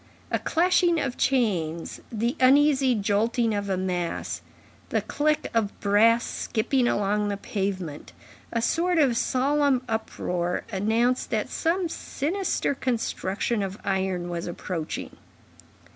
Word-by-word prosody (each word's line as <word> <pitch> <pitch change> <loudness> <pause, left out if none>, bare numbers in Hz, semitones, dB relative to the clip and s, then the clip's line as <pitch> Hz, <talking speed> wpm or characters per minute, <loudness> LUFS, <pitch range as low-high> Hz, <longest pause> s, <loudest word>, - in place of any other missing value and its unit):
A - - +1
clashing 345 0 +3
of 265 -4 -2
chains, 180 -11 0
the 235 +3 -1
uneasy 265 0 +5
jolting 220 +3 +1
of 205 -1 -2
a 190 - +1
mass, 180 -2 -2 0.5
the - - 0
click 300 +1 0
of 220 -3 0
brass 225 +3 +4
skipping 245 +3 0
along 205 0 +1
the 200 -1 -2
pavement, 190 -7 -4 0.4
a 230 -1 -1
sort 350 +6 +1
of 275 -6 +4
solemn 270 +2 +2
uproar, 180 -6 -2
announced 225 +5 +1
that - - -1
some 345 +2 0
sinister 330 +1 -2
construction 230 -4 -1
of 195 0 -3
iron 190 -2 -1
was 170 0 -4
approaching. 170 -2 -5
225 Hz, 120 wpm, -26 LUFS, 195-270 Hz, 0.5 s, uneasy